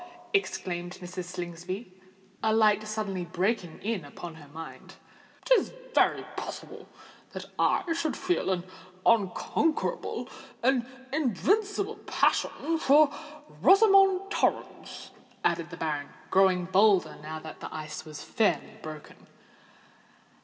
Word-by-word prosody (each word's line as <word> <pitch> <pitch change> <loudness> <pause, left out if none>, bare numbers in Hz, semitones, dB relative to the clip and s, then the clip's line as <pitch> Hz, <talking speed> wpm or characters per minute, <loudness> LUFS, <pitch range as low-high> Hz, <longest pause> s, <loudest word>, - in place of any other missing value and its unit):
exclaimed 175 - -1
Mrs. 180 0 -6
Slingsby, 180 +3 -6 0.5
a 220 - +2
light 215 -1 +4
suddenly 210 -4 -3
breaking 180 0 -1
in 210 -5 -1
upon 165 +4 -9
her 155 -2 -13
mind. 160 +3 -10 0.5
"It - - -8
is - - +4 0.2
very - - +3
possible - - -7 0.4
that - - -6
I - - +3
should 320 -2 -1
feel 360 - 0
an 180 -2 0 0.4
unconquerable—an 240 - 0 0.3
invincible 400 - +1
passion 325 0 +1
for 290 0 +6 0.5
Rosamond 390 - +6
Torrens," - - -2 0.3
added 170 -1 +1
the 165 - -9
baronet, 155 +2 -5
growing 185 -2 +4
bolder 195 +1 +4
now 155 +1 -6
that 155 0 -9
the - - -7
ice 155 0 -6
was 150 -2 -9
fairly 220 -2 0
broken. 155 -1 -10
190 Hz, 110 wpm, -28 LUFS, 175-285 Hz, 0.5 s, for